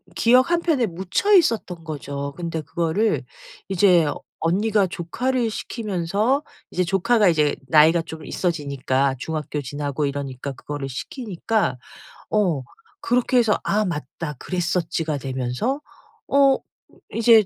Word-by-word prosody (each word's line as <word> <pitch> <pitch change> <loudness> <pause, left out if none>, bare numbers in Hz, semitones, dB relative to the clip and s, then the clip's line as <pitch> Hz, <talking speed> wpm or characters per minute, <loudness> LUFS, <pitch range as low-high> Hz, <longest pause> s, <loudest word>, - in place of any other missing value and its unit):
기억 250 - +4
한 345 0 +3
편에 305 -8 +2
묻혀 190 - 0
있었던 225 - +3
거죠. 140 -2 -5
근데 165 -2 -3
그거를 170 +8 0 0.5
이제 180 -3 +5 0.3
언니가 200 +5 +2
조카를 230 +8 -1
시키면서 215 - -1 0.3
이제 180 - 0
조카가 195 +4 +3
이제 150 -3 +2
나이가 160 +4 +5
좀 160 -1 -9
있어지니까 140 -5 0
중학교 150 +2 -3
지나고 145 +2 -3
이러니까 140 -1 -4
그거를 140 +1 -6
시키니까 205 - -2 0.5
어 185 -10 +2 0.4
그렇게 250 +1 +2
해서 225 -4 +3
'아 210 +1 +2
맞다 150 -2 -4
그랬었지.'가 170 -3 -1
되면서 130 - -2 0.5
어 275 -1 +5 0.6
'이제 225 -2 +6
175 Hz, 280 characters per minute, -23 LUFS, 150-220 Hz, 0.6 s, 이제